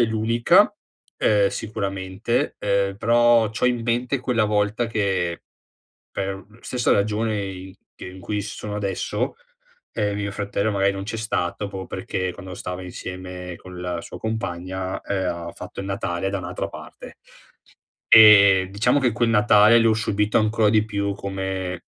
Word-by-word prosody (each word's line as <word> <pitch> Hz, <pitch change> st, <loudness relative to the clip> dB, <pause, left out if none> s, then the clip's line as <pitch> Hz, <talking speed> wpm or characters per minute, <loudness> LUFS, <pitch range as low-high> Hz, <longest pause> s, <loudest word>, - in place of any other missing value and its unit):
l'unica, 110 Hz, +2 st, +3 dB, 0.4 s
ehm, 105 Hz, -2 st, +3 dB
sicuramente, 100 Hz, +2 st, -3 dB
ehm, 100 Hz, -1 st, 0 dB
però 120 Hz, 0 st, +4 dB
c'ho 110 Hz, -, -3 dB
in 120 Hz, -2 st, 0 dB
mente 120 Hz, +3 st, 0 dB
quella 120 Hz, -3 st, +1 dB
volta 105 Hz, +2 st, 0 dB
che, 95 Hz, -6 st, -1 dB, 0.7 s
per 95 Hz, -1 st, -4 dB, 0.2 s
stessa 125 Hz, -1 st, 0 dB
ragione 105 Hz, 0 st, 0 dB
i 95 Hz, -1 st, -8 dB, 0.2 s
che -, -, -10 dB
in 90 Hz, +1 st, -10 dB
cui 105 Hz, +2 st, -3 dB
sono 105 Hz, 0 st, -6 dB
adesso, 100 Hz, -2 st, -2 dB, 0.6 s
ehm, 105 Hz, -2 st, -1 dB
mio 100 Hz, 0 st, -3 dB
fratello 100 Hz, +1 st, -2 dB
magari 100 Hz, -1 st, +2 dB
non 95 Hz, 0 st, -5 dB
c'è 115 Hz, -, -4 dB
stato, 105 Hz, -2 st, -2 dB
proprio 95 Hz, -1 st, -7 dB
perché 95 Hz, -1 st, -3 dB
quando 95 Hz, 0 st, -9 dB
stava 90 Hz, 0 st, -6 dB
insieme 90 Hz, 0 st, -7 dB
con 90 Hz, -1 st, -10 dB
la 90 Hz, -1 st, -3 dB
sua -, -, -10 dB
compagna, 95 Hz, -4 st, -4 dB
ehm, 95 Hz, -2 st, -2 dB, 0.2 s
ha -, -, -9 dB
fatto -, -, -9 dB
il 95 Hz, -, -5 dB
Natale 95 Hz, -1 st, -2 dB
da 100 Hz, -, -2 dB
un'altra 90 Hz, 0 st, -4 dB
parte. -, -, -11 dB, 0.9 s
Ehm, 100 Hz, -4 st, +8 dB
diciamo 115 Hz, +8 st, +2 dB
che 125 Hz, -3 st, +2 dB
quel 115 Hz, +1 st, 0 dB
Natale, 105 Hz, +1 st, +6 dB
l'ho 115 Hz, -1 st, +4 dB
subito 105 Hz, -1 st, +1 dB
ancora 110 Hz, 0 st, +2 dB
di 105 Hz, 0 st, +3 dB
più 100 Hz, -2 st, -2 dB
come, 95 Hz, -2 st, -4 dB
100 Hz, 150 wpm, -23 LUFS, 95-110 Hz, 0.9 s, Ehm